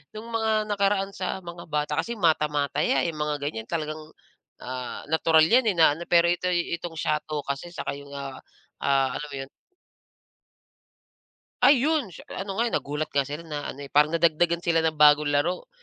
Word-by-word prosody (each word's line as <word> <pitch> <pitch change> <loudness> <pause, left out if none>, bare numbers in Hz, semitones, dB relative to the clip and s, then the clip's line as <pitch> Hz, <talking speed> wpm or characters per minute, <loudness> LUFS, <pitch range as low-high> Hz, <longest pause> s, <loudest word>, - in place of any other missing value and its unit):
nung 215 +2 -8
mga 220 -1 +1
nakaraan 200 -1 +1
sa 185 0 -3
mga 170 0 -9
bata 150 0 -1
kasi 235 - -2
mata-mataya, 150 -5 +1
eh, 170 - 0
'yung 155 - -9
mga 150 -1 -1
ganiyan 110 -6 -4
talagang, 155 -2 -3 0.6
ah, 125 -1 -6
natural 160 0 +4
'yan, 235 +6 +4
eh, 195 - 0
na 160 -3 +6
ano 170 - -6
pero 170 -1 +5
ito'y, 175 -1 0
itong 170 -2 -6
siyato 150 -1 -1
kasi 140 +5 -4
saka - - -4
'yung, 140 0 -12
ah 135 -1 -6 0.4
ah, 135 -2 +2
alam 150 - -6
mo - - -6
'yon? 135 0 -7 2.1
Ayun, 285 -4 +4
tsa - - -12 0.2
ano 195 0 -6
nga, 235 - +3
eh, 235 - -3
nagulat 150 +2 -2
nga 140 - +4
sila 150 +4 -6
na 150 -2 -4
ano, 140 +1 -9
eh, - - -17
parang 150 +1 +5
nadagdagan 170 +1 +2
sila 165 -2 +2
ng 160 -2 -1
bagong 150 0 +6
laro, 160 +6 0
160 Hz, 180 wpm, -26 LUFS, 145-180 Hz, 2.1 s, na